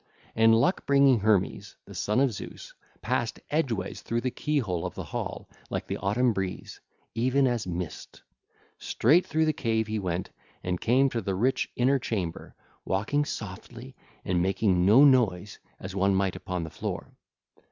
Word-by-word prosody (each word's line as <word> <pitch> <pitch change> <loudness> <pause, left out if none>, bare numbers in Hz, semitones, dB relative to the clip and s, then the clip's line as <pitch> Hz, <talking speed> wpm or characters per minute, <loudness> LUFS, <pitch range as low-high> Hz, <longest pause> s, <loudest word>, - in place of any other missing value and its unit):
And 115 0 +5
luck 150 +12 +1
bringing 140 -3 +5
Hermes, 100 -2 0
the - - -12
son 105 +4 0
of 135 -4 +2
Zeus, - - -9 0.3
passed - - -1
edgeways 140 -9 -1
through 115 0 -2
the 130 - -1
key 150 +4 -1
hole 90 -10 -1
of - - -5
the - - -5
hall - - -5 0.2
like - - -3
the - - -4
autumn 115 +5 +1
breeze, 95 -2 -5 0.3
even 130 +4 +2
as 120 -6 0
mist: 90 -2 -6 0.6
straight 155 +10 +3
through 160 +1 +1
the 155 - +2
cave 115 -7 0
he 110 0 -3
went 90 -2 -3 0.3
and 90 -1 -2
came 130 +4 +4
to 115 - -2
the 95 -1 -2
rich 130 +7 0
inner 135 +3 +3
chamber, 95 -9 -4 0.3
walking 120 +10 0
softly, 115 +4 -8 0.3
and 90 -1 +1
making 95 -1 +2
no 125 +8 +8
noise 105 -8 +2 0.2
as 95 +1 -7
one 100 0 +2
might 95 -1 0
upon 90 -2 -4
the 80 - -7
floor. 75 - -5
110 Hz, 165 wpm, -27 LUFS, 95-130 Hz, 0.6 s, no